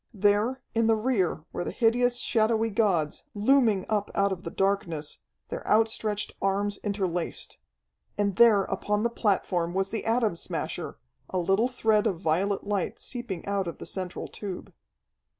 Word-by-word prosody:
There, 210 +6 +2
in 230 0 +2
the 225 - +5
rear, 215 -9 0
were - - -2
the - - -3
hideous, 245 +1 +2
shadowy 225 -1 +1
gods, 190 -8 +1
looming 220 -3 +3
up 210 -2 0
out 200 0 +2
of 185 -2 -3
the 165 - -5
darkness, 185 -6 -1 0.3
their - - -4
outstretched 215 -1 +1
arms 200 +1 0
interlaced. 185 -5 -3 0.6
And 200 -2 +1
there 220 -3 +6
upon 210 +2 -1
the 235 - +1
platform 180 -6 0
was 195 0 0
the 225 - -3
Atom 225 -6 +1
Smasher, - - -4 0.3
a 185 - -2
little 195 +6 +2
thread 220 -4 +2
of 180 -6 -1
violet 190 +4 0
light 200 -3 -2
seeping 240 -9 -5
out 200 -2 -1
of 170 - -5
the - - -8
central 185 -2 -4
tube. 195 -4 -7
205 Hz, 155 wpm, -27 LUFS, 190-225 Hz, 0.6 s, there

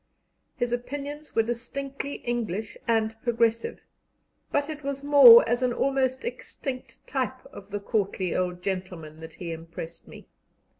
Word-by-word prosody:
His 245 -1 -1
opinions 285 +4 -5
were 225 - +4
distinctly 270 +4 -4
English 220 -4 -2
and 225 -1 +1
progressive, 230 -1 0 0.7
but 285 0 +1
it 305 -1 -7
was 280 0 -4
more 270 -6 +9
as 240 +2 +1
an 250 -1 +1
almost 265 - 0
extinct 270 - -6
type 260 -1 -3
of 200 0 -11
the 205 0 -3
courtly 200 -4 -1
old 180 -1 -1
gentleman 180 -5 -4
that 160 0 -10
he 170 -2 -6
impressed 165 0 -8
me. - - -12
235 Hz, 140 wpm, -27 LUFS, 195-270 Hz, 0.7 s, more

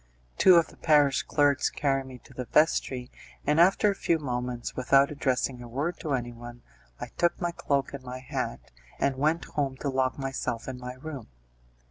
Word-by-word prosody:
Two 185 - +8
of 170 -1 +4
the - - -17
parish 145 -4 +4
clerks 145 -1 +2
carried 135 -2 -1
me 130 -1 -9
to - - -17
the 125 0 -5
vestry, 130 -3 +1 0.3
and 150 +2 +2
after 195 +4 +5
a - - -5
few 170 -3 +1
moments, 125 -4 -4
without 135 +2 +4
addressing 130 -3 -1
a 120 - -8
word 145 +9 -3
to 155 -5 -2
anyone, 120 -1 -7 0.4
I - - -6
took 175 0 +2
my 175 -1 -1
cloak 140 -5 -1
and 140 -2 -7
my 125 0 -6
hat, 130 - -5 0.3
and 140 -1 +1
went 155 +4 +1
home 135 -3 -2
to 140 - -3
lock 130 -1 0
myself 135 -4 -3
in 130 -1 -5
my 125 0 -6
room. 135 -2 -8
135 Hz, 185 wpm, -28 LUFS, 125-150 Hz, 0.4 s, Two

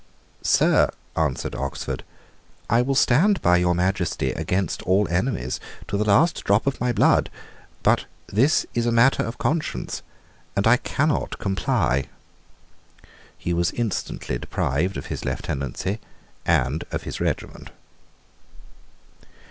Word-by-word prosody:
"Sir," - - +4 0.3
answered 75 -5 -1
Oxford, 70 +1 -4 0.7
"I 115 +2 +5
will 135 +2 0
stand 175 +12 +4
by 90 0 +5
your 90 0 +2
Majesty 90 0 0
against 95 -2 -1
all 95 +3 +2
enemies 90 - -1 0.3
to - - -3
the 105 - +2
last 110 +12 +3
drop 100 +2 +2
of 140 -3 -1
my 125 0 +2
blood. 120 - +3 0.5
But - - +3 0.2
this 130 +10 +2
is 120 0 0
matter 115 +3 +4
of 115 +2 -4
conscience, 160 0 -2 0.5
and 100 - +1
I 120 +2 +6
cannot 150 +4 -1
comply." 85 -8 0 1.3
He 85 - -2
was 85 0 +2
instantly 105 - -3
deprived 85 +12 -1
of - - -6
his - - -5
lieutenancy 70 - -3 0.5
and 65 +5 +2
of - - -4
his - - -5
regiment. - - -3
100 Hz, 125 wpm, -24 LUFS, 85-120 Hz, 1.3 s, I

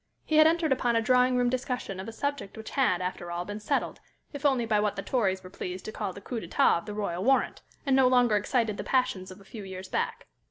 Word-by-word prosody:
He 310 - +1
had 310 0 +8
entered 325 -2 +1
upon 245 -2 +2
a 230 - +3
drawing 250 +1 +4
room 245 0 +2
discussion 250 -6 -2
of 190 - -6
a - - -5
subject 280 -2 -4
which 220 - -8
had, 185 -10 +2
after 180 -1 -4
all, 175 +1 -3
been 205 +2 -5
settled, 245 +7 -1 0.3
if 285 0 +1
only 260 -4 +1
by 215 -2 +2
what 210 -1 0
the 195 - -4
Tories 195 -7 0
were 185 - -11
pleased 180 -1 -6
to 215 - -5
call 205 -3 -3
the 200 - -11
coup 235 +3 -4
d'état 170 -1 +3
of 170 - -14
the 210 - -4
Royal 190 -4 -2
Warrant, 265 +3 +2 0.2
and 270 -2 +3
no 265 -1 +5
longer 245 -3 +4
excited 215 0 0
the - - -4
passions 255 -8 0
of 185 - -11
a 195 - -17
few 210 +1 -9
years 190 0 -7
back. - - -2
220 Hz, 255 wpm, -28 LUFS, 190-255 Hz, 0.3 s, had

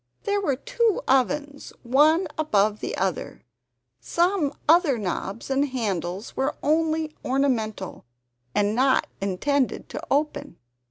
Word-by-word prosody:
There 405 0 0
were 285 -9 +1
two 470 - 0
ovens, 285 +2 0
one 300 +8 +4
above 215 -9 +1
the - - -4
other; 190 -3 -3 0.6
some 340 - +1 0.2
other 320 -5 +5
knobs 200 +4 -4
and 275 +2 +2
handles 200 -5 -3
were 265 +2 -1
only 315 0 +1
ornamental 235 - -1 0.5
and 205 0 +2
not 260 +3 +3 0.2
intended 250 +8 0
to - - -5
open. 290 - -1
270 Hz, 115 wpm, -25 LUFS, 215-310 Hz, 0.6 s, other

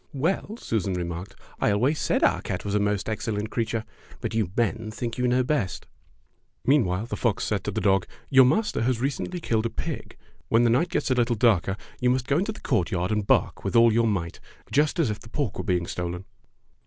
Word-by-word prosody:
"Well," 180 - -1
Susan 100 - -1
remarked, 85 +1 -5 0.2
"I - - +2
always 125 +10 +2
said - - +1
our - - +3
cat 90 - -4
was 100 - -2
a 105 - +3
most 100 -2 0
excellent 110 -1 -2
creature, 115 -1 -1 0.3
but - - -4
you 110 -5 0
men 115 -1 0
think 115 +2 -5
you 125 - +2
know 125 +1 +3
best." 125 - -1 0.8
Meanwhile 110 -8 +2
the 120 - -4
fox - - 0
said - - -1
to - - -1
the - - -2
dog: 95 -1 +2 0.2
"Your 135 -1 +7
master 210 - +1
has 120 0 +1
recently 140 +7 -2
killed 115 -7 0
a - - -6
pig. - - -6 0.3
When 115 +1 +4
the 120 - +4
night 160 +9 +2
gets 150 -5 -1
a - - +6
little 120 -1 +2
darker, 100 -4 +2 0.2
you 125 - +2
must 125 0 +1
go 140 +4 +2
into 205 +4 -1
the 215 - -11
courtyard 90 -5 0
and 105 -2 0
bark - - +2
with - - -2
all 115 -1 +6
your 115 +1 +3
might 90 -6 -2 0.3
just 150 +3 +2
as 150 -10 +2
if 105 - -5
the - - -14
pork 135 -5 -2
were - - -2
being 90 -4 0
stolen." 90 0 -4
115 Hz, 215 wpm, -26 LUFS, 100-130 Hz, 0.8 s, Your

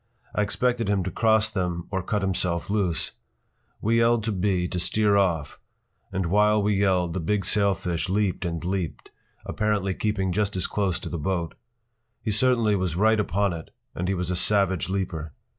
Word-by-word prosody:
I - - +1
expected 120 +2 0
him 100 -2 +1
to 95 - -3
cross 110 +2 +3
them 90 -5 -2
or 95 -1 -1
cut 105 +2 -2
himself 90 -1 0
loose. 90 -6 0 0.7
We 115 +2 +2
yelled 115 -1 +3
to 110 - -1
B. 95 -2 0
to 90 - -3
steer 105 +3 +2
off, 85 -7 0 0.5
and 95 0 -1
while 105 +4 +3
we 105 0 +1
yelled 95 -4 +1
the 95 - -2
big 95 +3 0
sailfish 95 -4 +1
leaped 100 -1 0
and 85 -1 -3
leaped, 90 -3 -3 0.3
apparently 105 -3 0
keeping 95 -2 -1
just 105 +1 0
as 90 - 0
close 100 -4 -1
to - - -5
the 85 - -4
boat. 85 +1 -2 0.7
He 110 - -2
certainly 115 -1 +3
was 90 -4 -1
right 110 +4 +3
upon 100 -2 +1
it 80 -1 -8 0.2
and 90 - -3
he 95 - +1
was 90 0 -2
a - - 0
savage 95 -2 +2
leaper. 85 -6 -3
95 Hz, 180 wpm, -25 LUFS, 90-105 Hz, 0.7 s, cross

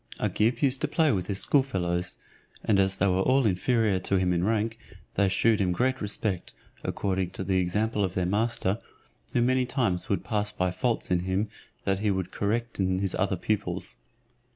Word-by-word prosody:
Agib 115 +6 +1
used 135 -1 +1
to 155 - +1
play 155 0 +2
with 90 -4 -1
his 100 -1 0
schoolfellows, 90 -11 +1 0.5
and 100 -2 +3
as 95 0 +2
they 100 - +2
were 95 -1 +2
all 130 +5 +3
inferior 105 +1 +2
to 95 +1 0
him 90 -1 +2
in 85 0 0
rank, 110 +2 0 0.3
they 100 -1 +2
shewed 105 +3 +3
him 90 -2 +2
great 130 +8 0
respect, 100 -2 -2 0.3
according 95 -2 -1
to 95 +1 -6
the 95 0 +1
example 105 +4 0
of 95 -1 -2
their 90 - +1
master, 105 +1 0 0.6
who 120 - +4
many 130 +1 +3
times 115 -10 -1
would 100 -4 0
pass 105 -2 -1
by 90 0 0
faults 110 +5 -1
in 90 - +3
him 95 +4 -1 0.3
that 95 -1 0
he 105 0 +1
would 95 -2 -1
correct 115 +3 -2
in 95 -1 +1
his 95 -1 -1
other 95 0 0
pupils. 95 -2 -1
100 Hz, 190 wpm, -27 LUFS, 95-115 Hz, 0.6 s, who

